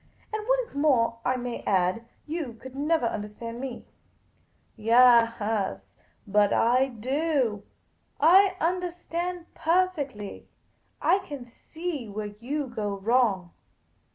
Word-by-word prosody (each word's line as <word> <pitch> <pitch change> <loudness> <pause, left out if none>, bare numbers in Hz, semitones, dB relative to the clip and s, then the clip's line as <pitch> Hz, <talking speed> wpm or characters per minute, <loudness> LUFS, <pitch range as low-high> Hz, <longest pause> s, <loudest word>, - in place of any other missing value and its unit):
" - - -32
And 430 0 -3
what - - +3
is 480 - -10
more, 255 -6 +2
I 255 - +1
may 245 -1 -4
add, 185 +3 +1 0.2
you 305 -6 -4
could 260 +3 -12
never 300 -1 +1
understand 230 +2 -5
me." 260 -3 -6 0.5
" - - -40
Yaas, 230 - +4 0.5
but 205 0 +3
I 250 +3 +3
do. 260 -2 -1 0.6
I 375 +5 +6
understand 350 0 -3
perfectly. 315 - -1 0.6
I 390 - +4
can 285 -9 -8
see 300 +1 -6
where 205 0 -5
you 285 +4 -2
go 215 -5 -3
wrong. 200 -4 +1
250 Hz, 120 wpm, -27 LUFS, 225-325 Hz, 0.6 s, I